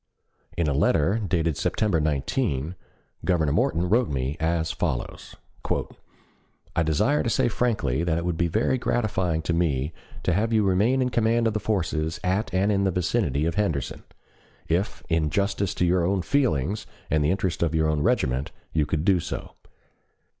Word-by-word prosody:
In 85 - +1
a 70 - +1
letter, 85 +7 +2
dated 85 -7 0
September 105 -6 +1
19, 75 - -1 0.5
Governor 80 -5 +2
Morton 85 +4 +1
wrote 115 +5 +2
me 65 0 -2
as 80 0 0
follows: - - -4 1.4
"I - - +3
desire 80 - +2
to 120 - -1
say - - +2
frankly 105 - 0
that 85 -2 +1
it 85 - -2
would 90 -2 0
be 85 +1 +1
very 110 +8 +1
gratifying 95 -10 0
to 85 - -1
me 80 -3 0 0.3
to 90 - +1
have 110 +5 +1
you 110 -2 +3
remain 105 +8 +3
in 125 - 0
command 115 0 +2
of 110 - +2
the 110 - 0
forces 85 -4 -1
at 95 +4 0
and 95 +3 +2
in 100 -1 +2
the 95 - +2
vicinity 90 - 0
of 85 - 0
Henderson, 85 -9 -1 0.7
if 90 +5 -1
in 80 -3 +1
justice 100 +1 0
to 90 - +1
your 90 0 +2
own 95 +1 +1
feelings 100 - 0 0.2
and 75 -1 +3
the 75 - +2
interest 95 -2 -1
of 80 -1 +1
your 80 -1 +2
own 75 -1 0
regiment, 65 0 +1 0.2
you 75 -2 +1
could 75 +1 -1
do 95 -3 +4
so. - - -5
85 Hz, 175 wpm, -25 LUFS, 80-105 Hz, 1.4 s, do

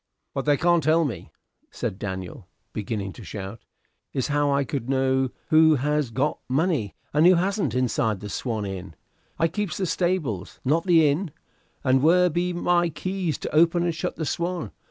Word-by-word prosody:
"What 135 - -3
they 145 -1 +3
can't 175 +1 +3
tell 160 +1 +3
me," 95 - -5 0.4
said 95 - -4
Daniel, 95 -4 -6 0.3
beginning 100 -2 -3
to 115 - -11
shout, 100 +3 -7 0.5
"is 130 0 -1
how 145 0 +2
I 140 0 +2
could 135 -2 -4
know 130 -1 +2 0.2
who 160 -1 +6
has 150 0 0
got 135 +6 -1
money, 140 - 0 0.2
and 155 +3 +5
who 185 - +7
hasn't, 185 - 0
inside 115 -4 +1
the 105 - -7
'Swan' 110 0 -3
Inn. 95 -3 -6 0.4
I 165 - +3
keeps 180 -1 -3
the 190 - 0
stables, 165 - -1
not 160 +6 +2
the 165 -3 +6
inn: 160 +6 0 0.5
and 130 -1 +3
where 180 +4 +4
be 175 +3 0
my 175 0 +2
keys 180 +1 -2
to - - -5
open 170 +2 +4
and 170 -1 0
shut 160 - -3
the 160 - -3
'Swan'? 170 +2 -2
150 Hz, 175 wpm, -25 LUFS, 120-170 Hz, 0.5 s, who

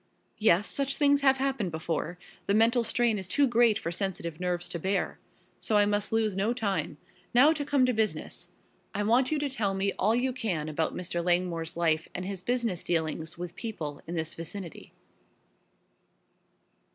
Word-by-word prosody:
"Yes, 210 -2 +4
such 275 0 -1
things 285 -1 +4
have 270 -1 +5
happened 265 -7 -1
before 160 +1 -3 0.3
the 200 - +3
mental 230 +2 +4
strain 230 -1 +1
is 190 - -6
too 285 +9 +3
great 235 -3 +4
for 170 - -4
sensitive 170 -4 -3
nerves 175 -1 -1
to 170 - -4
bear. 195 +4 -1 0.4
So 215 - +1
I 205 - +5
must 205 0 -1
lose 220 -3 +1
no 205 +5 +1
time. 200 -10 -2 0.4
Now 285 +6 +7
to 295 -2 -3
come 280 -2 +3
to 250 - +1
business. 220 -1 -2 0.5
I 205 - 0
want 245 +6 +3
you 310 - +2
to 290 0 -1
tell 215 -8 -1
me 195 +1 0
all 215 +4 +3
you 255 +1 +1
can 180 -11 -2
about 155 +1 -1
Mr. 175 -1 -2
Langmore's 175 -2 0
life 160 -2 +1
and 185 - -3
his 195 -1 -4
business 235 -6 -1
dealings 160 -1 -1
with 175 0 -6
people 155 -11 -5
in 170 - -4
this 160 0 -2
vicinity." 170 +1 -7
200 Hz, 175 wpm, -29 LUFS, 170-240 Hz, 0.5 s, Now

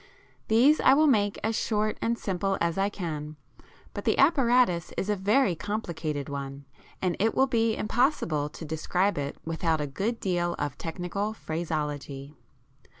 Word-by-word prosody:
These 255 +8 +5
I 265 - +6
will 310 +2 +5
make 205 -8 +2
as 220 +1 0
short 215 -1 0
and 230 +1 0
simple 195 -1 -1
as 170 -1 0
I 195 +1 +1
can, 155 -6 -5 0.6
but - - -5
the - - +1
apparatus 245 - +3
is 205 - 0
a - - +2
very 205 +2 +2
complicated 165 -7 -3
one, 140 0 -6 0.4
and 180 -2 +1
it 225 +2 +1
will 265 - +5
be 230 -3 +1
impossible 210 - +1
to 160 - -9
describe 170 +4 0
it 140 0 -4
without 165 0 0
a 150 - -1
good 205 - -2
deal 175 -2 0
of 145 0 -3
technical 180 +5 -3
phraseology. 150 -6 -4
185 Hz, 155 wpm, -27 LUFS, 155-220 Hz, 0.6 s, I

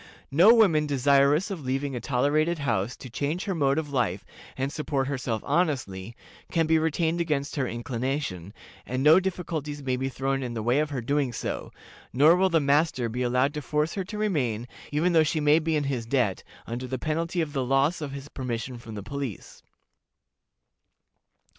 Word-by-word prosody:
No 175 +10 +7
woman 180 -10 +4
desirous 140 +5 +3
of 175 -7 -5
leaving 135 +1 -2
a - - -2
tolerated 150 +7 +1
house 120 -6 -1
to - - -10
change 145 +8 -3
her 195 - -1
mode 140 -4 +1
of 150 -3 -3
life, 105 -8 0 0.3
and 135 +2 -2
support 145 -3 -1
herself 125 -5 -3
honestly, 120 - -1 0.4
can 165 -1 +2
be 160 0 +3
retained 160 +1 0
against 150 -4 -1
her 135 -4 0
inclination, 120 - -3 0.3
and 130 +2 -3
no 155 +4 +7
difficulties 160 -6 -4
may 130 -1 0
be 135 +1 -2
thrown 135 +1 -1
in 120 -2 -4
the 110 - -3
way 120 +5 +2
of 155 0 0
her 135 -4 -3
doing 140 +1 0
so; - - -4 0.4
nor 150 +7 +6
will 190 +1 +3
the 165 -2 +3
master 140 -4 +2
be 125 +3 -4
allowed 125 +3 +2
to 150 - -4
force 150 +3 -1
her 195 - -2
to 210 +3 -7
remain, 130 - -1 0.2
even 165 +5 +1
though 160 - +6
she 155 +1 +1
may 150 +1 +4
be 160 0 -1
in 150 - +1
his 130 -5 -3
debt, 120 -7 0 0.2
under 120 +2 -5
the 130 +1 -3
penalty 165 +5 -2
of 155 -3 -1
the 135 -3 0
loss 135 +6 +1
of 145 -2 -4
his 140 0 -7
permission 125 -2 -5
from 115 -2 -9
the 100 - -6
police. 135 -2 -6
140 Hz, 190 wpm, -26 LUFS, 125-155 Hz, 0.4 s, No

